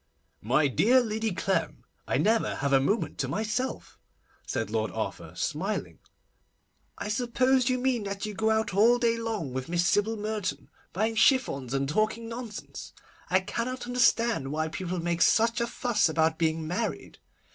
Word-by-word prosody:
'My 135 Hz, +7 st, +2 dB
dear 215 Hz, -, +4 dB
Lady 220 Hz, -2 st, -1 dB
Clem, 190 Hz, +2 st, -1 dB, 0.2 s
I -, -, +1 dB
never 225 Hz, +1 st, +2 dB
have 140 Hz, 0 st, -1 dB
a 135 Hz, -, +6 dB
moment 200 Hz, +12 st, -1 dB
to -, -, 0 dB
myself,' 220 Hz, +5 st, -3 dB, 0.5 s
said -, -, -2 dB
Lord -, -, 0 dB
Arthur, -, -, -5 dB
smiling. -, -, -3 dB, 1.0 s
'I -, -, -5 dB
suppose 250 Hz, +3 st, +2 dB
you 255 Hz, -, +1 dB
mean 250 Hz, -4 st, 0 dB
that 200 Hz, 0 st, -4 dB
you 210 Hz, -, -5 dB
go 220 Hz, +2 st, 0 dB
about 220 Hz, -2 st, +1 dB
all 225 Hz, +5 st, +5 dB
day 230 Hz, -1 st, +1 dB
long 220 Hz, -, -3 dB
with 130 Hz, +3 st, -4 dB
Miss 175 Hz, 0 st, +1 dB
Sybil 215 Hz, +2 st, +1 dB
Merton, 210 Hz, -2 st, -3 dB, 0.2 s
buying 220 Hz, +5 st, 0 dB
chiffons 180 Hz, -, +2 dB
and 135 Hz, 0 st, 0 dB
talking 215 Hz, +8 st, 0 dB
nonsense? 230 Hz, -2 st, -8 dB, 0.4 s
I 185 Hz, +1 st, +3 dB
cannot 240 Hz, +6 st, -4 dB
understand 235 Hz, -, +2 dB
why 155 Hz, +1 st, -1 dB
people 180 Hz, +2 st, -4 dB
make 170 Hz, 0 st, -1 dB
such 230 Hz, +1 st, +3 dB
a 235 Hz, -, 0 dB
fuss 240 Hz, -7 st, +1 dB
about 160 Hz, 0 st, +1 dB
being 160 Hz, -1 st, 0 dB
married. 185 Hz, +8 st, -4 dB
215 Hz, 160 wpm, -28 LUFS, 170-235 Hz, 1.0 s, a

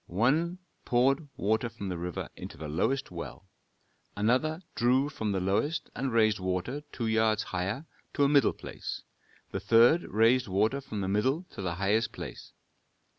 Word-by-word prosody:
One 150 Hz, -, +1 dB, 0.3 s
poured 135 Hz, +5 st, +2 dB
water 110 Hz, +4 st, +1 dB
from 105 Hz, -4 st, -6 dB
the 90 Hz, -, -3 dB
river 90 Hz, 0 st, -4 dB
into -, -, -9 dB
the 75 Hz, +1 st, -6 dB
lowest 130 Hz, -, 0 dB
well; 90 Hz, +3 st, -8 dB, 0.7 s
another 130 Hz, -, +1 dB
drew 130 Hz, +4 st, +2 dB
from 110 Hz, -7 st, -3 dB
the 95 Hz, -, 0 dB
lowest 100 Hz, -, 0 dB
and 130 Hz, +1 st, -2 dB
raised 110 Hz, -2 st, +3 dB
water 95 Hz, +10 st, -2 dB
two 120 Hz, -, -3 dB
yards 110 Hz, -1 st, +2 dB
higher 95 Hz, -, -3 dB, 0.3 s
to 145 Hz, -, +3 dB
a -, -, +6 dB
middle 140 Hz, -4 st, +4 dB
place; -, -, -7 dB, 0.5 s
the -, -, -2 dB
third 120 Hz, +9 st, +5 dB
raised 115 Hz, +3 st, +3 dB
water 110 Hz, +8 st, +1 dB
from 110 Hz, -6 st, -5 dB
the 95 Hz, -, -2 dB
middle 130 Hz, -, +1 dB
to -, -, -7 dB
the 85 Hz, -3 st, -2 dB
highest 100 Hz, +5 st, +1 dB
place. -, -, -8 dB
110 Hz, 165 wpm, -29 LUFS, 100-135 Hz, 0.7 s, a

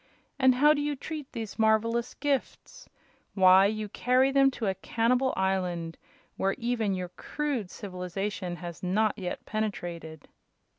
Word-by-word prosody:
And 260 Hz, -1 st, +5 dB
how 295 Hz, +4 st, +6 dB
do 290 Hz, -, -1 dB
you 290 Hz, 0 st, -1 dB
treat 300 Hz, 0 st, -7 dB
these 225 Hz, -3 st, -6 dB
marvelous 230 Hz, +2 st, +2 dB
gifts? 280 Hz, -2 st, -3 dB, 0.5 s
Why, 190 Hz, 0 st, +7 dB
you 215 Hz, 0 st, -3 dB
carry 255 Hz, +5 st, +2 dB
them 275 Hz, 0 st, +5 dB
to 245 Hz, -4 st, -5 dB
a 195 Hz, -, +1 dB
cannibal 235 Hz, +7 st, +1 dB
island, 180 Hz, -3 st, -1 dB, 0.4 s
where 195 Hz, 0 st, +1 dB
even 230 Hz, -4 st, -1 dB
your 180 Hz, -1 st, -4 dB
crude 260 Hz, +1 st, -3 dB
civilization 185 Hz, 0 st, -4 dB
has 175 Hz, -1 st, -8 dB
not 205 Hz, +4 st, +1 dB
yet 180 Hz, -2 st, -5 dB
penetrated!" 175 Hz, -8 st, -4 dB
215 Hz, 140 wpm, -28 LUFS, 185-250 Hz, 0.5 s, Why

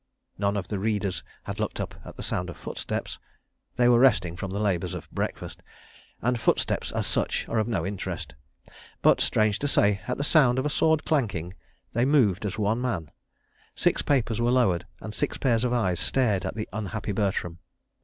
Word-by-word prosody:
None 100 Hz, 0 st, +1 dB
of 95 Hz, -, -3 dB
the 105 Hz, -, -2 dB
readers 100 Hz, -2 st, -1 dB, 0.2 s
had -, -, -6 dB
looked -, -, -2 dB
up -, -, -3 dB
at -, -, -11 dB
the -, -, -6 dB
sound 90 Hz, 0 st, -2 dB
of -, -, -8 dB
footsteps—they 120 Hz, -, -4 dB
were 120 Hz, -1 st, +6 dB
resting 105 Hz, -10 st, +4 dB
from 95 Hz, +2 st, -5 dB
the 100 Hz, +2 st, -3 dB
labours 90 Hz, -4 st, 0 dB
of -, -, -7 dB
breakfast, -, -, -4 dB, 0.6 s
and 125 Hz, 0 st, +1 dB
footsteps, -, -, +1 dB
as -, -, -1 dB
such, -, -, -1 dB
are 115 Hz, -, 0 dB
of 110 Hz, -, 0 dB
no 95 Hz, -9 st, -1 dB
interest. 95 Hz, -8 st, -4 dB, 0.7 s
But, -, -, +5 dB
strange 110 Hz, -1 st, +2 dB
to 145 Hz, -, -1 dB
say, 100 Hz, -7 st, +3 dB
at 125 Hz, -, -1 dB
the 140 Hz, -, -1 dB
sound 135 Hz, -5 st, +4 dB
of 130 Hz, -, 0 dB
a 150 Hz, -, 0 dB
sword 160 Hz, 0 st, +2 dB
clanking, 100 Hz, -, 0 dB, 0.4 s
they 120 Hz, +2 st, +2 dB
moved 110 Hz, -, +3 dB
as 100 Hz, -, -5 dB
one 110 Hz, +3 st, +1 dB
man; 95 Hz, -, -2 dB, 0.6 s
six -, -, +2 dB
papers 120 Hz, -5 st, +1 dB
were 120 Hz, -, +3 dB
lowered 100 Hz, -9 st, +2 dB
and 110 Hz, -, -6 dB
six 140 Hz, +6 st, -1 dB
pairs 120 Hz, -3 st, +2 dB
of 125 Hz, -, +1 dB
eyes 95 Hz, -8 st, +1 dB
stared 110 Hz, -8 st, +1 dB
at -, -, -5 dB
the 110 Hz, -1 st, -3 dB
unhappy 110 Hz, 0 st, -3 dB
Bertram. 95 Hz, -4 st, -1 dB
110 Hz, 190 wpm, -26 LUFS, 95-125 Hz, 0.7 s, were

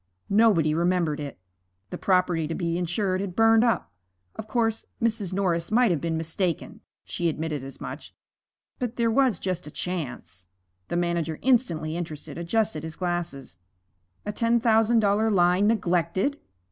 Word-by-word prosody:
Nobody 200 Hz, -8 st, +4 dB
remembered 170 Hz, -2 st, +1 dB
it. 145 Hz, -6 st, -6 dB, 0.5 s
The -, -, -4 dB
property 180 Hz, -4 st, +2 dB
to 165 Hz, -, -3 dB
be 170 Hz, -2 st, -1 dB
insured 185 Hz, +2 st, -1 dB
had 190 Hz, -3 st, -5 dB
burned 225 Hz, 0 st, +5 dB
up. 230 Hz, -, 0 dB, 0.4 s
Of 220 Hz, -, -7 dB
course, 225 Hz, -1 st, 0 dB
Mrs. 220 Hz, -5 st, 0 dB
Norris 180 Hz, -3 st, 0 dB
might 235 Hz, 0 st, +4 dB
have 165 Hz, -, 0 dB
been 165 Hz, -1 st, -1 dB
mistaken 165 Hz, +1 st, -2 dB, 0.2 s
(she 170 Hz, -1 st, -1 dB
admitted 155 Hz, -3 st, -3 dB
as 135 Hz, 0 st, -9 dB
much), -, -, -8 dB, 0.6 s
but 245 Hz, -1 st, -3 dB
there 230 Hz, -1 st, +1 dB
was 255 Hz, -5 st, +3 dB
just 180 Hz, -2 st, -3 dB
a -, -, -6 dB
chance 150 Hz, -, -5 dB, 0.4 s
The 175 Hz, -, -2 dB
manager, 170 Hz, -2 st, -1 dB
instantly 170 Hz, -12 st, +1 dB
interested, 160 Hz, -4 st, -6 dB
adjusted 170 Hz, -2 st, 0 dB
his 160 Hz, 0 st, -7 dB
glasses. 170 Hz, -, -4 dB, 0.7 s
A 210 Hz, -, -2 dB
ten 230 Hz, +2 st, +2 dB
thousand 225 Hz, 0 st, +4 dB
dollar 210 Hz, +2 st, +2 dB
line 180 Hz, 0 st, +3 dB
neglected! 190 Hz, -, +1 dB
180 Hz, 150 wpm, -26 LUFS, 165-220 Hz, 0.7 s, burned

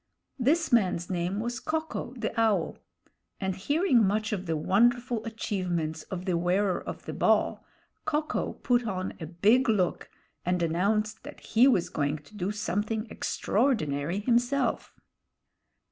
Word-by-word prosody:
This 310 Hz, +4 st, +2 dB
man's 185 Hz, -6 st, +2 dB
name 180 Hz, +3 st, -1 dB
was 240 Hz, +3 st, -3 dB
Ko 315 Hz, +3 st, -1 dB
ko, 290 Hz, -5 st, -6 dB
the 225 Hz, -2 st, -2 dB
Owl; 205 Hz, -7 st, +1 dB, 0.6 s
and 190 Hz, -2 st, -1 dB
hearing 275 Hz, -, +3 dB
much 210 Hz, +2 st, +1 dB
of 190 Hz, -3 st, -3 dB
the 160 Hz, -1 st, 0 dB
wonderful 235 Hz, +6 st, +2 dB
achievements 180 Hz, -8 st, -2 dB
of 185 Hz, -1 st, -5 dB
the 185 Hz, -3 st, +1 dB
Wearer 180 Hz, +3 st, +1 dB
of -, -, -7 dB
the -, -, -5 dB
Ball, -, -, +2 dB, 0.4 s
Ko 300 Hz, +1 st, +1 dB
ko -, -, -2 dB
put 245 Hz, -1 st, +1 dB
on 185 Hz, -2 st, -3 dB
a 160 Hz, -, -5 dB
big 215 Hz, -, +3 dB
look 190 Hz, -5 st, 0 dB, 0.3 s
and 180 Hz, 0 st, 0 dB
announced 210 Hz, +6 st, 0 dB
that -, -, -10 dB
he 235 Hz, +4 st, +4 dB
was 195 Hz, -10 st, +3 dB
going 145 Hz, 0 st, -1 dB
to 150 Hz, +8 st, -17 dB
do 195 Hz, 0 st, -2 dB
something 210 Hz, +2 st, -2 dB
extraordinary 175 Hz, -, 0 dB
himself. 245 Hz, +5 st, +1 dB
210 Hz, 145 wpm, -28 LUFS, 180-240 Hz, 0.6 s, he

